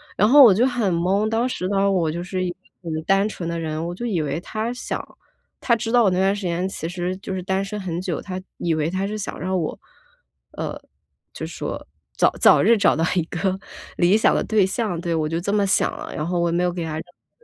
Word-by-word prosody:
然 210 - +4
后 285 +1 +9
我 215 -6 +8
就 235 +6 +3
很 235 -8 0
懵， 195 +5 +1
当 230 +3 +1
时 185 -7 -3
呢， 200 0 +2
我 170 -4 +1
就 170 +2 -4
是 185 0 -3
一 - - -1
个 175 - -12 0.3
很 160 -1 -3
单 195 +3 +3
纯 175 -5 -5
的 170 0 -2
人， 160 0 -3
我 175 - -4
就 240 +7 -5
以 185 -9 0
为 150 +2 -2
他 220 +5 -3
想 245 - -4 0.6
他 235 - +3
知 225 0 -3
道 240 -1 +5
我 195 - +4
那 180 - 0
段 195 +1 +3
时 205 - -6
间 175 +1 -1
其 165 - -5
实 180 +1 -3
就 190 0 -6
是 185 - -4
单 190 +1 0
身 210 +1 -5
很 175 -3 -3
久， 180 -4 -3
他 185 -1 -6 0.2
以 170 -2 0
为 155 +1 0
他 190 +2 -2
是 215 +1 -4
想 205 - -5
让 185 +1 -1
我， 160 - -3 0.7
呃， - - -5 0.6
就 - - -5
说 - - -6 0.3
早 - - +5
早 - - +7
日 230 -1 +5
找 195 - +3
到 165 - +2
一 175 - +3
个 185 +3 -2 0.4
理 185 +4 +4
想 - - +3
的 - - +1
对 210 -4 +3
象。 190 -3 -2
对， 170 -1 -1
我 155 -1 0
就 165 +1 -1
这 200 +3 -2
么 205 -1 +3
想 190 - +1
了， - - -7
然 150 +2 -3
后 175 -1 0
我 170 - +1
也 - - -1
没 180 - +1
有 180 - +1
给 175 -2 -3
他 160 -1 -4
任 160 - -3
何 175 - -22
185 Hz, 280 characters per minute, -22 LUFS, 170-205 Hz, 0.7 s, 后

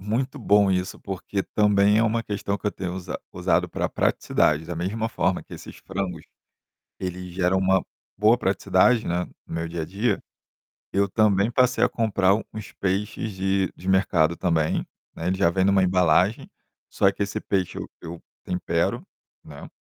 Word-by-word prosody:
Muito 130 +8 -2
bom 105 -3 +4
isso, 90 0 -2
porque 95 +1 -4
também 105 0 +3
é - - +4
uma 115 +1 0
questão 100 -2 -3
que - - -22
eu - - -3
tenho 90 -3 -5
usa 95 -1 -5
usado - - +1
pra - - -2
praticidade. 75 +1 +1
Da 85 0 -6
mesma 105 +7 -2
forma 90 -5 0
que - - -18
esses - - -10
frangos, 95 -4 -4 0.8
eles 90 -1 -5
geram 90 +1 +1
uma 95 0 +3 0.4
boa 110 +4 +5
praticidade, 105 +3 +2
né, 85 +1 0 0.2
no - - -8
meu 85 0 -3
dia 85 -1 -3
a - - -5
dia, 100 +5 -1 0.7
eu 100 0 +2
também 105 0 +3
passei 125 +1 +2
a - - +4
comprar 100 -4 +2 0.2
uns 105 -3 -8
peixes 100 +3 -2
de 95 -1 0
de 90 - -11
mercado 85 -4 +2
também, 80 -4 0 0.3
né, 80 - -4
ele 95 +1 0
já 95 -3 +3
vem 95 +2 +1
numa 100 0 +4
embalagem, 90 +2 +2 0.4
só 95 - +3
que 100 - -2
esse 105 +2 -4
peixe 95 -3 -1
eu - - -7
eu 85 0 -8 0.2
tempero, 85 -2 -1 0.4
né. - - -11
95 Hz, 175 wpm, -24 LUFS, 90-105 Hz, 0.8 s, boa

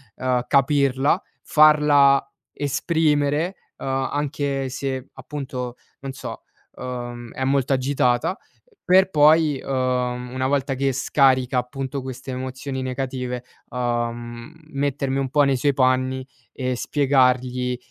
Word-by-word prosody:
uhm, 125 -1 0
capirla, 140 +3 +2 0.2
farla 150 -2 +5 0.3
esprimere, 150 +3 0 0.2
uhm, - - -8 0.3
anche 140 -2 -2
se 130 0 -4
appunto, 130 -4 -6 0.3
non 135 0 -5
so, - - -8 0.3
uhm, 120 -2 -6
è 130 - -3
molto 135 0 +1
agitata, 130 - +1 0.5
per 190 +1 +4
poi, 150 -2 +4
uhm, 125 -2 -1
una 130 0 -1
volta 140 0 0
che 135 +1 0
scarica 130 -1 +2
appunto 135 +2 -4
queste 130 0 -7
emozioni 130 +1 -5
negative, 130 -1 -3 0.3
uhm, 120 +1 -3 0.2
mettermi 140 -1 -1
un 135 -1 -1
po' 145 +2 +4
nei 135 -2 +2
suoi 140 +3 +2
panni 130 0 +1 0.3
e 130 -1 -2
spiegargli 125 -2 +1
130 Hz, 115 wpm, -23 LUFS, 125-140 Hz, 0.5 s, farla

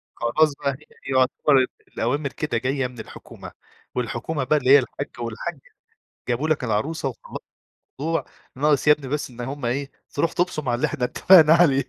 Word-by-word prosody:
خلاص 145 +6 +2
بقى، 140 -1 0
هي - - -7
دي 150 +3 -18 0.3
يعتبر 130 +1 +3 0.2
الأوامر 140 +5 -2
كده 150 +3 -2
جاية 130 0 -1
من 125 -2 -13
الحكومة، 110 - -11 0.4
والحكومة 125 +4 -2
بقى 150 +4 +2
اللي 130 -3 -1
هي 140 +1 +9
الحَاج 140 +2 -5
وَالحَاجّة، 120 +7 -5 0.7
جابوا 125 +5 0
لك 155 -4 +1
العروسة 135 +6 -1
وخلّص 120 - -9 0.6
ضوع 165 +2 -1 0.3
ناقص 145 +2 +1
يا - - +9
ابني 150 -2 -8
بس 150 +1 -3
إن 125 -1 -9
هم 135 +1 -5
إيه، 135 +4 -2 0.2
تروح 165 +3 0
تُبصم 175 -6 -1
على 120 - +2
اللي 120 - 0
إحنا 125 - -4
اتفقنا 160 +3 +6
عليه. 145 -5 +4
140 Hz, 175 wpm, -23 LUFS, 125-150 Hz, 0.7 s, هي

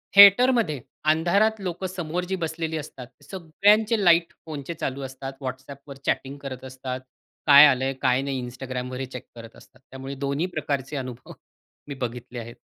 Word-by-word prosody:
थिएटरमध्ये 200 - +7 0.3
अंधारात 200 +7 +2
लोकं 185 0 -3
समोर 175 -1 -3
जी 190 - 0
बसलेली 160 -2 -3
असतात 135 -4 -8 0.2
सगळ्यांचे 205 +5 +2
लाईट 170 -1 +4
फोनचे 150 -1 -6
चालू 140 -4 -4
असतात. 135 +1 -7
WhatsApp 130 +2 -6
वर 140 - -8
चॅटिंग 135 +1 -1
करत 130 -2 -7
असतात. 130 -1 -6 0.5
काय 145 0 +10
आलं 130 -2 +2
आहे, 135 - -1
काय 130 0 +3
नाही 135 -2 -3
Instagram 125 0 -5
वर 130 - -5
हे 135 - -2
चेक 125 -1 -9
करत 115 -1 -11
असतात. - - -19
त्यामुळे 135 +1 -7
दोन्ही 140 +5 0
प्रकारचे 145 -2 -2
अनुभव 130 -2 -7 0.6
मी 140 - -5
बघितले 120 0 -5
आहेत. 120 +1 -9
140 Hz, 165 wpm, -25 LUFS, 130-170 Hz, 0.6 s, काय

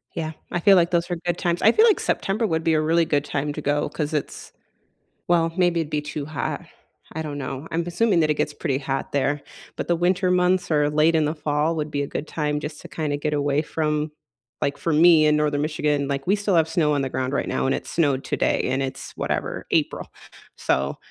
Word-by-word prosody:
Yeah, 160 -1 -3 0.2
I 175 - 0
feel 195 +3 +6
like 170 -1 +3
those 170 0 +1
are 175 - -1
good 175 0 0
times. 175 -2 -1
I 220 - +6
feel 445 - +5
like 435 - +4
September 210 +4 0
would 160 -5 -1
be 165 -1 +2
a 155 - +3
really 165 +2 +2
good 145 -2 0
time 145 0 -2
to 150 - -5
go 145 0 0
'cause 150 0 -3
it's 150 - -4 0.8
well, 165 -1 +2
maybe 175 -2 +3
it'd 155 -2 -4
be 150 - 0
too 150 -1 -5
hot, 155 -1 -4 0.5
I 160 - -4
don't 150 -2 -5
know. 135 +2 -5
I'm 165 +1 -1
assuming 175 +1 +2
that 155 -1 +2
it - - +3
gets 150 0 -1
pretty 135 -3 -1
hot 135 -1 -3
there, 145 +1 0 0.3
but - - -3
the 175 - +2
winter 180 +2 +1
months 180 0 +2
or 150 -2 +3
late 155 +2 +3
in 155 -2 +3
the 150 - -1
fall 150 +1 0
would 150 -1 -3
be 145 - -2
a 140 - -2
good 145 - -5
time 150 -2 -2
just 150 0 -6
to - - -11
kinda 150 -3 -2
get 150 +1 -1
away 145 0 +1
from 150 -1 -1 0.5
like, 140 - -1
for 165 - -1
me 160 0 +6
in 150 0 +4
Northern 150 -1 +1
Michigan, 150 -2 0
like, 140 -1 -3
we 195 - +3
still 200 -3 0
have 160 -1 +3
snow 160 -2 +1
on 145 -1 +1
the 135 - -2
ground 130 0 -2
right 140 - -1
now, - - -1
and 135 - +2
it - - -8
snowed 140 -5 0
today, - - 0
and 130 +1 0
it's 130 0 -5
whatever - - -3
April, - - 0 0.5
so, 70 +1 0
155 Hz, 240 wpm, -23 LUFS, 145-170 Hz, 0.8 s, feel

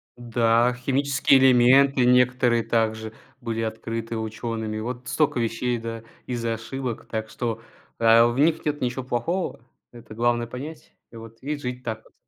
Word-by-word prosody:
Да, 120 0 +2
химические 135 +1 +2
элементы 130 +1 +5
некоторые 125 -1 +3
также 110 -1 -1 0.3
были 115 -2 -3
открыты 115 +1 -4
учёными. 110 -1 -4
Вот 125 +3 -6
столько 150 -5 +1
вещей, 115 +1 -1
да, 115 0 -6 0.2
из-за 115 -2 -2
ошибок. 120 +1 -5
Так 110 -1 -4
что, 115 -2 -4 0.4
а, 115 +1 +6
в 120 +2 -2
них 160 +2 +2
нет 150 0 -1
ничего 125 +1 -2
плохого. 130 +10 -2 0.3
Это 115 -2 -12
главное 120 0 +1
понять. 150 +6 -9 0.2
И - - -14
вот, 115 0 -11
и 150 +3 -3
жить 125 -2 -6
так 110 -2 -5
вот. - - -23
120 Hz, 150 wpm, -24 LUFS, 115-130 Hz, 0.4 s, а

